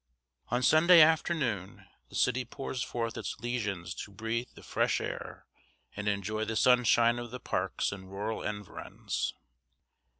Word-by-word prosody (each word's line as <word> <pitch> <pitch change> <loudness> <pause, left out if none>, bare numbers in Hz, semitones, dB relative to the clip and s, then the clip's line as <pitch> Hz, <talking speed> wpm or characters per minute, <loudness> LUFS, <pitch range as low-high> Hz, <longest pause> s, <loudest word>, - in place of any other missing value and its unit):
On 125 +2 0
Sunday 170 +4 +7
afternoon 155 - +2 0.2
the - - -11
city 130 +2 +2
pours 130 +1 -5
forth 115 -2 -3
its - - -5
lesions 105 -7 -3
to - - -7
breathe 115 +4 -3
the - - -13
fresh - - +1
air - - -6 0.5
and 105 0 -4
enjoy 105 +2 -1
the 110 0 -3
sunshine 120 0 +4
of 120 0 -6
the 125 +2 -7
parks 90 -5 -1
and 95 -2 -8
rural 105 +3 -3
environs. 105 -2 -4
115 Hz, 140 wpm, -30 LUFS, 105-125 Hz, 0.5 s, Sunday